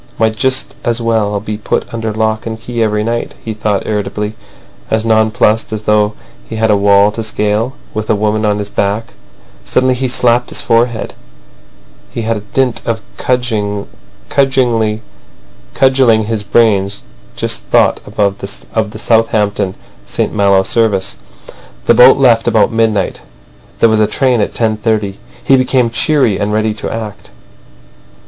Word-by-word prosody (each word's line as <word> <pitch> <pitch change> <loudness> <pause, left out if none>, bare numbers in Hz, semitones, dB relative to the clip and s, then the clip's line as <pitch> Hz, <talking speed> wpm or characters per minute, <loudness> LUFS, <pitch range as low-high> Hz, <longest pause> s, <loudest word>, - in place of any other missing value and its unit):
"Might 110 -1 +1
just 130 +2 0
as 120 -1 0
well 110 -3 0
be 105 0 -5
put 110 - -2
under 115 -1 -3
lock 110 +1 -1
and 110 0 -5
key 120 +1 -4
every 105 -1 +1
night," 115 +1 -3
he 110 - -3
thought 105 -2 -1
irritably, 105 0 -3 0.6
as 110 0 0
nonplussed 110 0 +2
as 110 -1 -4
though 105 0 +2 0.4
he 115 - -5
had 110 0 +2
a - - +4
wall 100 0 +4
to 115 - -5
scale 110 +3 -1 0.2
with 110 0 -3
the 110 - +2
woman 105 +1 0
on 105 -1 +1
his 105 0 -5
back. 105 +3 -2 0.5
Suddenly 130 - +1
he 130 +1 -1
slapped 120 -1 +1
his - - -3
forehead. 115 0 0 1.0
He 115 - -5
had 115 0 -1
by 105 - -8
dint 130 -3 0
of 115 -1 -2 0.2
cudgelling 115 +1 -1 1.3
his 110 -1 -3
brains 100 -3 +2 0.3
just - - -1
thought - - +3
of 100 -1 -1
the 105 +2 -4
Southampton—St 105 -4 -1
Malo 100 -2 +3
service. 105 -4 0 0.7
The - - +5
boat 125 +2 +7
left 120 -4 +3
about 110 -2 +3
midnight. 110 -4 0 0.6
There - - +5
was 110 0 +2
a 105 - +3
train 125 +1 +1
at - - -1
10.30. 110 -3 -1 0.3
He 135 - +4
became 130 -2 +2
cheery 125 -4 +2
and 100 +1 -1
ready 110 0 0
to 110 - -4
act. 110 -2 -6
110 Hz, 145 wpm, -14 LUFS, 105-115 Hz, 1.3 s, boat